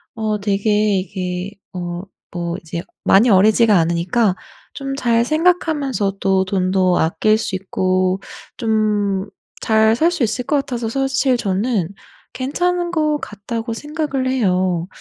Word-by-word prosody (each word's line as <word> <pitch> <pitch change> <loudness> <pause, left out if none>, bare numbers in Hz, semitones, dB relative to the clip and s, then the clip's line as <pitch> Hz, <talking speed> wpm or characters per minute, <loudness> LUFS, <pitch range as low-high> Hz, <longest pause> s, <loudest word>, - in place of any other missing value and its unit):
어 215 -2 -1
되게 205 0 +1
이게 185 0 -4 0.2
어 175 -1 -5 0.3
뭐 170 -1 -3
이제 170 +1 -6 0.2
많이 220 +4 +5
어리지가 215 +3 +5
않으니까 175 +6 +1 0.4
좀 275 -1 -4
잘 235 -3 +2
생각하면서도 270 - +1
돈도 185 -1 +1
아낄 215 +6 +2
수 190 - -3
있고 185 0 0 0.4
좀 210 -3 0 0.3
잘 220 0 +3
살 325 +8 +2
수 350 -4 -4
있을 235 +2 -1
것 295 - +1
같아서 245 -5 -3
사실 270 +1 +1
저는 200 -2 -1 0.4
‘괜찮은 350 +7 -1
거 305 -3 +1
같다.‘고 225 0 -5
생각을 295 0 -3
해요. 185 -8 +1
215 Hz, 240 characters per minute, -19 LUFS, 185-260 Hz, 0.4 s, 많이